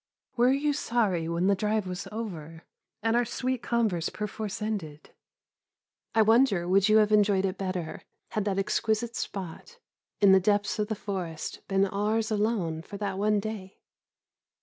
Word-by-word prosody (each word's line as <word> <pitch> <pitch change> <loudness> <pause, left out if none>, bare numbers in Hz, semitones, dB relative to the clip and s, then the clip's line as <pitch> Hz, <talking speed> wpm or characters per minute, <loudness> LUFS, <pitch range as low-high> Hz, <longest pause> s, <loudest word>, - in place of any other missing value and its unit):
Were 245 +1 +4
you 290 +2 +1
sorry 200 -11 0
when 170 +2 0
the 200 - +4
drive 210 +1 0
was 180 +1 -5
over, 165 -8 -6 0.4
and 225 0 +2
our 240 - +4
sweet 255 +1 -2
converse 220 -9 0
perforce 210 -1 -5
ended? 190 -9 -5 1.0
I 220 - +6
wonder 220 -5 +4
would 195 +3 +4
you 215 - +6
have 215 -1 +4
enjoyed 205 -2 +4
it 190 0 -3
better 185 -4 -3 0.3
had 215 - -1
that 195 -2 0
exquisite 220 +4 0
spot, 195 - -6 0.4
in 200 -2 +6
the 190 - +7
depths 205 +2 +1
of 210 - 0
the 220 - -2
forest, 185 -6 -5
been 195 0 +3
ours 215 +3 0
alone 205 -7 0
for 200 +4 -9
that 195 -2 -3
one 210 0 +2
day? 200 -2 -6
205 Hz, 160 wpm, -28 LUFS, 185-220 Hz, 1.0 s, the